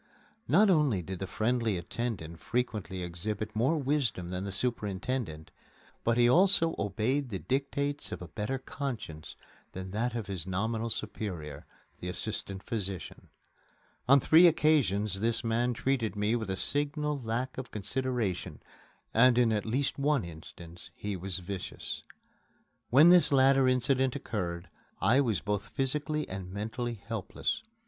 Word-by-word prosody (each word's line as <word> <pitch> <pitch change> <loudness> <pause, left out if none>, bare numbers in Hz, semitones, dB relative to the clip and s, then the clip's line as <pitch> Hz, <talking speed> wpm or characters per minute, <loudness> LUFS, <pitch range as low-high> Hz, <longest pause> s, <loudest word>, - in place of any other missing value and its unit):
Not 195 - +5
only 145 - +2
did 95 +1 -6
the 95 - -4
friendly 115 0 0
attendant 85 -3 -4
frequently 105 -5 -2
exhibit 105 +5 -4
more 130 +9 +2
wisdom 135 - -1
than 90 +1 -3
the 100 - -4
superintendent, 100 -5 -2 0.5
but 115 0 +2
he 120 0 +5
also 165 +3 +4
obeyed 115 +7 0
the 100 - -3
dictates 140 +5 -2
of - - -4
a 90 - -8
better 105 +9 -3
conscience 125 - -6 0.4
than 95 0 -6
that 115 +4 -1
of 115 -3 -3
his 95 -2 -5
nominal 110 +5 -1
superior, 90 -9 -5 0.3
the 90 - -5
assistant 100 0 -1
physician. 100 -5 -5 0.8
On 140 +1 +8
three 165 +6 +7
occasions 110 - +3
this 115 +3 0
man 120 +2 +1
treated 120 -3 -1
me 105 +3 +1
with 110 -4 -3
a 95 - 0
signal 145 - 0
lack 120 +3 -2
of 130 - -6
consideration, 120 -2 -2 0.5
and 120 +2 +6
in 120 -2 +4
at 105 0 -1
least 135 +5 0
one 140 -6 +2
instance 85 +1 -11
he 105 -1 -4
was 95 0 -1
vicious. 95 +1 -6 0.9
When 145 +7 +7
this 180 -3 +6
latter 135 -1 +5
incident 130 +1 +2
occurred, 90 -9 -4 0.3
I 130 +5 +4
was 115 -7 0
both 105 +1 -2
physically 150 +3 0
and 95 -1 -6
mentally 115 +4 -3
helpless. 110 -1 -3
115 Hz, 140 wpm, -30 LUFS, 95-130 Hz, 0.9 s, On